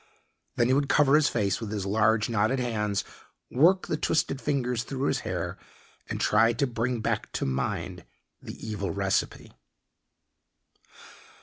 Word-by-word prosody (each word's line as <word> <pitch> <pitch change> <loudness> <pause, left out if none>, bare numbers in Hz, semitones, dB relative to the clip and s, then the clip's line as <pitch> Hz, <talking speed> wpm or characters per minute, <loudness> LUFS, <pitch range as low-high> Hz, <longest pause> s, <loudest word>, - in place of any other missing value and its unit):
Then 120 - +2
he 130 - +3
would 140 0 +1
cover 145 -2 +4
his 150 -1 +4
face 100 -2 0
with 110 - -4
his 105 -2 -3
large, 110 +1 +2
knotted 115 +3 +1
hands, 105 -5 -1 0.5
work 175 +8 +4
the 155 - -2
twisted 150 -3 0
fingers 125 -4 0
through 135 +2 -3
his - - +1
hair, - - -4 0.5
and - - -3
try 115 +2 +4
to 140 +5 +1
bring 120 -1 -2
back - - -2
to - - -2
mind 85 +7 -3 0.4
the - - -9
evil 100 -3 -3
recipe. 80 - -1
115 Hz, 145 wpm, -27 LUFS, 105-135 Hz, 0.5 s, cover